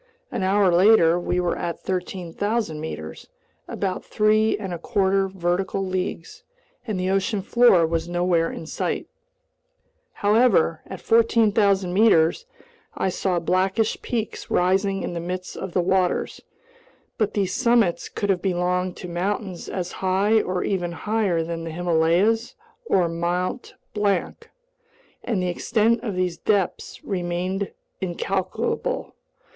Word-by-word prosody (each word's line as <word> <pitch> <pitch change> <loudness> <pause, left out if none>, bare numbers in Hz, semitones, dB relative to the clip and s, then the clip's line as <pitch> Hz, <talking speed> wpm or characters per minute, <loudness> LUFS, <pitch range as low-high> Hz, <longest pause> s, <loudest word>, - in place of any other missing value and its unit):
An - - -3
hour 190 0 +3
later 175 -2 +5
we 175 0 -1
were 175 -1 0
at 170 -1 -4
13,000 185 0 -2
meters—about 160 - -6
three 215 +1 +2
and 190 -4 -5
a 170 - -5
quarter 195 +2 +1
vertical 190 +1 -1
leagues—and 190 - -6
the 185 +1 0
ocean 195 +1 0
floor 220 -6 +5
was 165 +1 -2
nowhere 175 -1 +1
in - - -7
sight. - - -3 1.1
However, 205 -6 +3
at 190 - -8
14,000 210 -5 +3
meters 200 - +3 0.5
I 190 - 0
saw 185 0 -1
blackish 190 +6 0
peaks 225 -3 -4
rising 195 +2 +1
in - - -4
the 170 - -3
midst 180 +2 -5
of 190 -2 -6
the 180 - +2
waters. 185 0 0 0.8
But 215 -2 0
these 195 -3 0
summits 235 -8 +2
could 205 -1 -1
have 180 -2 -1
belonged 180 -1 -1
to 180 - -7
mountains 185 +1 -3
as 180 -2 -4
high 195 +4 +2
or 180 0 -2
even 175 -3 -1
higher 200 -3 0
than 165 0 -5
the 165 - -5
Himalayas 175 +7 +1 0.3
or 185 - +2
Mt. 175 +7 -2 0.2
Blanc, 205 -3 -1 0.7
and 200 -6 -1
the - - 0
extent 220 +6 +1
of 210 -6 -4
these 180 -2 -1
depths 200 0 -1
remained 185 +1 -2 0.3
incalculable. 190 - -2
185 Hz, 130 wpm, -23 LUFS, 175-205 Hz, 1.1 s, later